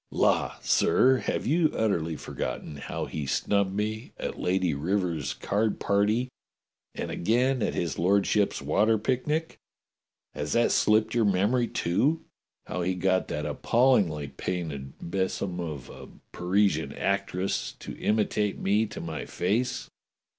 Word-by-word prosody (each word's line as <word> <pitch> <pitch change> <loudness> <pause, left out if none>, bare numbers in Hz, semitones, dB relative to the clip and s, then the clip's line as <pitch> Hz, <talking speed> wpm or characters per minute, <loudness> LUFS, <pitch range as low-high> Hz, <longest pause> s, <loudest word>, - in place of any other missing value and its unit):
^ - - -63
" - - -51
"La, - - +2
sir, 130 0 +4
have 105 - -2
you 160 +3 +3
utterly 85 -7 0
forgotten 70 +1 -5
how - - -4
he 75 -3 -5
snubbed 100 +6 +1
me 110 +2 -3
at - - -5
Lady 90 -2 +1
Rivers's 80 -2 -1
card 105 +2 0
party 105 +5 +2 0.7
and - - -4
again 125 +6 +1
at - - 0
his 85 -2 -2
lord 100 +4 +3
ship's 100 -8 +1
water 105 +10 +3
picnic? 150 +8 -1 0.7
Has 75 - -3
that 120 - +3
slipped 110 0 +3
your 115 -2 +3
memory, 105 +6 +2
too? 120 - 0 0.4
How 90 - -3
he 90 +1 0
got 95 0 +1
that 75 0 -3
appallingly 85 - +2
painted 75 -5 -4
besom 95 0 -2
of 75 -7 -5
a - - -11 0.2
Parisian 95 +3 +1
actress 100 -1 -1
to - - -9
imitate 105 -1 +1
me 105 +3 +2
to - - -7
my 80 -2 -5
face? 120 +7 -1
100 Hz, 140 wpm, -27 LUFS, 85-110 Hz, 0.7 s, sir